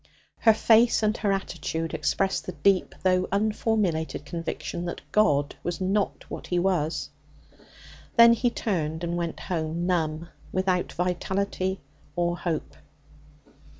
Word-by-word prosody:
Her 225 - +6
face 230 +1 +4
and 215 0 +2
her 205 -3 0
attitude 165 -4 -3
expressed 195 -1 0
the 185 - -4
deep 190 +2 +2
though 185 -1 +3
unformulated 200 -7 0
conviction 170 +2 -4
that 175 - -5
God 145 -9 +3
was 175 +1 -3
'not 195 +2 0
what - - -7
He 180 - 0
was.' 165 -5 0 1.0
Then 235 -1 +8
he 240 +1 +1
turned 165 -8 -2
and 170 0 -1
went 170 -1 -3
home, 165 0 -2
numb, 165 -2 -1 0.2
without 185 -1 0
vitality 190 +1 -1 0.3
or 175 0 +1
hope. 170 -3 -3
180 Hz, 125 wpm, -26 LUFS, 165-200 Hz, 1.0 s, Then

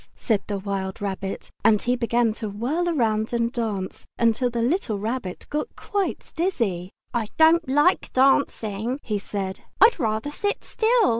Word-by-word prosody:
said 215 -4 0
the 205 - -2
wild 195 -1 -3
rabbit. 195 -1 -4
And 215 -2 +5
he 245 +3 +1
began 235 -1 +1
to 215 - -2
whirl 250 +12 -1
round 230 -9 +1
and 235 0 +1
dance, 215 -7 -3 0.3
till 250 +2 0
the 235 -1 -1
little 245 - 0
Rabbit 215 -3 -4
got 300 +9 -2
quite 400 -2 -3
dizzy. 230 - -1 0.2
"I 235 -3 0
don't 320 -1 +5
like 295 +7 +3
dancing," 255 -3 +2
he 210 -2 -1
said. 195 -1 -4 0.2
"I'd 460 -5 +6
rather 220 +3 -1
sit 410 +7 -2
still!" 455 -1 +3
235 Hz, 155 wpm, -24 LUFS, 205-290 Hz, 0.3 s, I'd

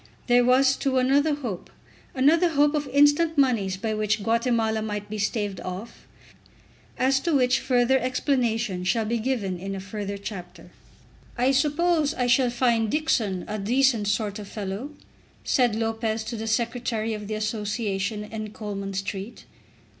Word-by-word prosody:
There 245 0 +4
was, 260 +2 +4
too, 270 -2 0
another 285 +4 +3
hope, 235 -11 -6 0.5
another 315 +7 +4
hope 295 -1 +3
of 295 -2 -1
instant 290 +3 +3
moneys 225 -9 +2
by 220 +2 -2
which 215 0 0
Guatemala 225 -1 +1
might 210 -1 -5
be 215 - -4
staved 205 -2 -1
off, 185 +5 -8 0.9
as 265 +1 +2
to 320 +2 0
which 255 -1 +3
further 255 +1 +2
explanation 240 -7 0
shall 220 +4 +1
be 235 +2 -1
given 215 -7 -2
in 195 +2 -5
a - - -5
further 200 +1 -5
chapter. 180 -4 -9 0.7
"I 250 +2 +3
suppose 305 +2 +2
I 250 - 0
shall 250 +1 +3
find 235 -2 +1
Dixon 225 - 0
a 215 - -4
decent 235 0 +2
sort 205 0 -1
of 205 - -8
a - - -13
fellow?" 205 +5 -5 0.5
said 245 -5 +2
Lopez 225 0 -1
to 235 +2 -5
the 225 0 -5
Secretary 230 -1 -1
of 210 -1 -6
the 215 - -3
Association 210 -1 -2
in 215 0 -7
Coleman 200 -2 -5
Street. 195 +3 -5
225 Hz, 155 wpm, -25 LUFS, 205-260 Hz, 0.9 s, There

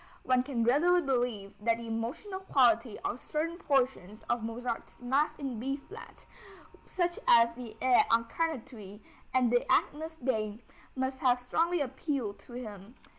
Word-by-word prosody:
One 255 -1 +3
can 250 -3 -1
readily 315 +9 +4
believe 245 -7 -1
that 230 +1 +2
the 235 - -8
emotional 230 - -4
quality 240 - +3
of 245 - -3
certain 330 +3 -3
portions 255 - 0
of 240 - -1
Mozart's 230 +1 -4
Mass 265 +5 +1
in 270 -6 -4
B 270 +4 -2
flat, 410 +11 -12 0.6
such 350 -1 -1
as 235 0 +6
the 235 -2 -9
Et 255 -1 +5
incarnatus 230 - -1 0.3
and 250 -2 +3
the 245 0 +2
Agnus 320 +2 +1
Dei, 220 -4 -2 0.3
must 260 0 -2
have 250 -1 +3
strongly 330 +7 +1
appealed 265 -6 -3
to 240 - -12
him. 215 -2 -8
250 Hz, 145 wpm, -31 LUFS, 230-280 Hz, 0.6 s, as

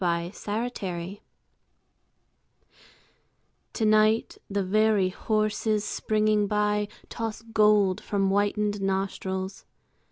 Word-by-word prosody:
WINTER 185 +7 -2
EVENING 180 +1 -5 2.5
To 225 - 0
night 215 +1 +3
the 200 0 0
very 210 0 +3
horses 215 +1 0
springing 215 -1 +1
by 210 0 +1 0.2
Toss 225 -1 -4
gold 210 -4 +3
from 195 -2 0
whitened 205 +1 0
nostrils. 190 0 -2
210 Hz, 85 wpm, -26 LUFS, 195-215 Hz, 2.5 s, night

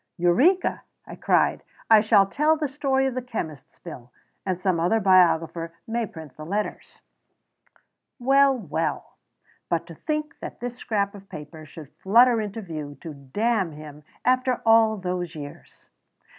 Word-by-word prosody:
"Eureka!" 255 - +2 0.2
I - - -9
cried. - - +1 0.3
"I 220 -2 +7
shall 210 -2 +5
tell 300 +10 +1
the 305 -1 -1
story 270 -1 0
of 265 - -1
the 255 - -3
chemist's 160 - -7
bill, 125 -8 -11 0.4
and 185 -2 -1
some 185 -2 0
other 180 +7 +2
biographer 170 -4 +3
may 230 0 -2
print 160 -9 -11
the 155 - -9
letters." 205 +6 -5 1.1
Well, 275 +1 +4
well! 230 - -4 0.5
but - - 0
to - - -11
think 305 -1 -4
that - - -8
this 245 0 -5
scrap 200 -4 -1
of 195 -1 -13
paper 155 -2 -10
should 150 -1 -12
flutter 235 +3 +5
into 210 +1 -5
view 150 -5 -7
to 160 - -7
damn 185 - -1
him 150 0 -11 0.2
after 255 0 +1
all 225 -1 +5
those 180 -2 -4
years! 145 -2 -11
195 Hz, 150 wpm, -24 LUFS, 165-240 Hz, 1.1 s, I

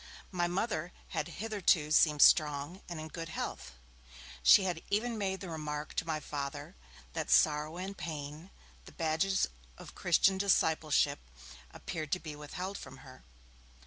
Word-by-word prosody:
My 175 -2 0
Mother 180 -2 -2 0.2
had 150 - -2
hitherto 180 -5 +1
seemed 150 -2 +5
strong 150 +3 +4
and 170 -2 -5
in 155 - -6
good 165 +1 -7
health; 65 - -5 0.7
she 125 - +7
had 175 -3 -2
even 225 +4 0
made 190 -3 -2
the 190 - -6
remark 150 -1 -4
to - - -2
my 155 -1 -1
Father, 145 +3 -5 0.4
that 160 -2 -3
'sorrow 155 +1 +3
and 190 +2 -5
pain, 155 0 -6 0.4
the - - -13
badges 165 +4 +1 0.3
of - - -11
Christian 190 +3 +3
discipleship', 160 - +2 0.4
appeared 155 - -6
to 180 - 0
be 155 -4 -7
withheld 180 +7 -6
from - - -10
her. 130 - -14
160 Hz, 145 wpm, -32 LUFS, 150-185 Hz, 0.7 s, she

